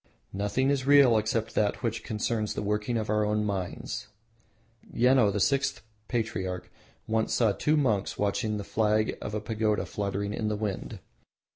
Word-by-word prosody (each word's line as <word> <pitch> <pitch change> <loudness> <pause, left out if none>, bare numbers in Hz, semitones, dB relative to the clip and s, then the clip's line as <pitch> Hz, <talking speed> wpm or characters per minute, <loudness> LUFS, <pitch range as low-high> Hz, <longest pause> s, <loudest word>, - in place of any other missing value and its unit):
Nothing 105 +8 +1
is 135 -2 -1
real 140 -4 +7
except 110 +1 0
that 105 +4 0
which 115 -1 -2
concerns 110 0 -2
the 105 - -2
working 105 +3 -1
of 110 -1 -2
our 105 0 +2
own 105 0 0
minds. 95 -3 -4 0.8
Yeno, 125 -3 +4
the 105 - -1
sixth 135 +6 +1 0.2
patriarch, 105 -6 -3 0.3
once 110 0 0
saw 115 -4 +3
two 150 +9 +1
monks 110 -9 +1
watching 105 +1 0
the 100 - -4
flag 110 +1 +1
of 105 - -4
a - - 0
pagoda 105 0 0
fluttering 100 0 -3
in 110 - -2
the 105 - 0
wind. 105 -3 -4
110 Hz, 160 wpm, -28 LUFS, 105-115 Hz, 0.8 s, real